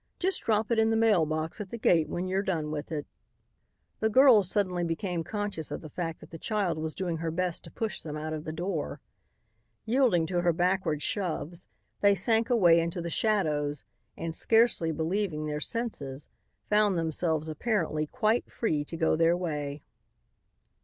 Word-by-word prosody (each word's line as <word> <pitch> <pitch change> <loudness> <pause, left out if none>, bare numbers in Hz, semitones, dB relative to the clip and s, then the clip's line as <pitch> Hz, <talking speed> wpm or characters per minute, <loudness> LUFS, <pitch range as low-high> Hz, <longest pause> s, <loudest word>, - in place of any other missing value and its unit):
Just 370 +1 0
drop 220 0 +1
it 230 - +3
in 220 0 +4
the 225 - +2
mail 210 -8 +4
box 155 +6 -3
at 200 - -7
the 235 - -5
gate 165 -7 +3
when 180 +1 -3
you're 190 +1 0
done 165 -6 -2
with 150 +1 -5
it." 150 -2 -3 0.9
The 220 - +2
girls 230 -6 +6
suddenly 185 -4 0
became 170 0 -2
conscious 205 -3 -3
of - - -5
the 155 - -10
fact 165 -2 -4
that 155 - -14
the 165 - -8
child 195 -6 -1
was 155 0 -4
doing 175 -3 -2
her 165 0 -2
best 175 +1 -1
to - - -11
push 225 -2 -3
them 150 -1 -6
out 155 +1 -4
of 155 -1 -4
the 155 - -5
door. 170 0 -3 0.9
Yielding 225 -8 +3
to 175 +1 0
her 175 -1 +2
backward 175 -3 0
shoves, 175 -3 -2 0.3
they 200 0 +5
sank 225 +4 +2
away 175 -9 +5
into 170 +1 -2
the 170 0 -4
shadows 150 -9 0 0.3
and, 165 -1 -4
scarcely 225 -6 +3
believing 160 0 -1
their 150 0 -2
senses, 150 - -3 0.4
found 210 -3 +3
themselves 160 -1 -1
apparently 155 -2 -1
quite 230 +3 0
free 155 -10 0
to 165 - -7
go 160 -1 +2
their 165 +2 +3
way. 150 -4 -4
175 Hz, 180 wpm, -29 LUFS, 155-210 Hz, 0.9 s, girls